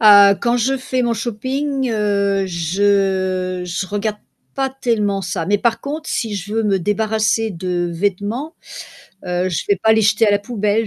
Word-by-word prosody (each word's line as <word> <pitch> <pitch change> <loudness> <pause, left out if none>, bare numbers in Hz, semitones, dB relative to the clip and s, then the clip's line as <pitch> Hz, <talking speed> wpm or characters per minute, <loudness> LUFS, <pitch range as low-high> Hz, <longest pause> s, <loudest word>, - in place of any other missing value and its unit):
Ah, 200 -2 +8
quand 235 +1 +2
je 265 +3 +1
fais 255 0 -2
mon 235 -1 +1
shopping, 260 +5 -2
heu, 200 -2 +1
je 185 +1 0
je 180 +2 -3
regarde 210 +2 -2 0.4
pas 270 -1 0
tellement 215 -7 0
ça, 185 -2 -3
mais 205 +2 +2
par 230 +1 +1
contre, 305 +3 -5
si 220 -4 -2
je 200 +2 -5
veux 225 - +1
me 200 -2 +1
débarrasser 215 +3 0
de 175 -1 -2
vêtements, 205 - -2 0.7
heu, 180 0 -1
je 170 - -2
vais 200 - +4
pas 220 - +5
les 220 - +4
jeter 210 +2 +3
à - - +4
la 205 - +3
poubelle, 215 0 0
205 Hz, 175 wpm, -19 LUFS, 190-230 Hz, 0.7 s, Ah